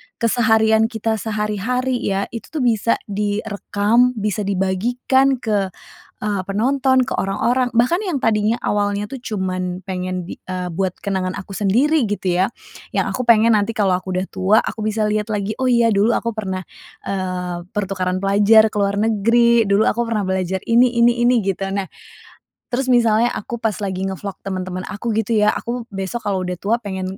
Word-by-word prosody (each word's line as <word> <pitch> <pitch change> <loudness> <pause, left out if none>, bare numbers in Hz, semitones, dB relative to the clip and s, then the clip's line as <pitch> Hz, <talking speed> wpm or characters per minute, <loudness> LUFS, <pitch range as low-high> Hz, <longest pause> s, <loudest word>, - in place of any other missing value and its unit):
keseharian 220 -1 +3
kita 225 -1 -2
sehari-hari 220 +4 -1
ya, 195 0 0
itu 230 - -7
tuh 305 -5 -3
bisa 230 -1 +2
direkam, 210 +3 0
bisa 210 -1 -2
dibagikan 240 +8 +1
ke, 210 -5 0 0.6
eee, 205 -3 -1
penonton, 260 +5 +2
ke 245 - -3
orang-orang. 235 +6 +1
Bahkan 250 +10 +3
yang 340 -8 -1
tadinya 215 0 +2
awalnya 205 0 -1
tuh 270 - -6
cuman 185 -5 -3
pengen 185 -1 -4
bi - - -7
eee, 180 -1 -4
buat 185 +2 -1
kenangan 190 -2 -2
aku 190 - -8
sendiri 250 +8 +2
gitu 200 -3 -2
ya, 190 - +4 0.5
yang - - 0
aku 250 - -3
pengen 225 -1 +5
nanti 205 +2 -1
kalau 200 -3 +1
aku 185 0 -6
udah 185 +1 -1
tua, 190 +3 +3
aku 220 - -5
bisa 215 0 0
liat 210 0 0
lagi 205 +1 -2
oh 260 - 0
iya 235 -2 +4
dulu 210 +3 +3
aku 230 - -1
pernah, 190 -3 -3 0.4
eee, 180 -2 -3
pertukaran 185 -2 -2
pelajar 210 +3 +5
ke 215 - -10
luar 200 0 +1
negeri, 230 +1 +3
dulu 200 +2 +3
aku 235 +1 0
pernah 220 -2 -1
belajar 190 0 -2
ini 240 +2 +4
ini 240 0 +4
ini 245 -3 +3
gitu. 195 0 -2
Nah, 200 -1 -2 0.8
terus 255 +1 0
misalnya 230 -1 +3
aku 235 - -5
pas 215 -2 -1
lagi 190 -2 -3
nge-vlog 195 +1 -5
teman-teman 185 -1 -4
aku 215 +2 -3
gitu 225 +1 0
ya, 210 0 +3
aku 235 0 -4
besok 195 +5 -4
kalau 190 -2 0
udah 180 0 -4
tua 210 +5 +1
pengen 190 -1 -4
210 Hz, 170 wpm, -20 LUFS, 190-235 Hz, 0.8 s, pengen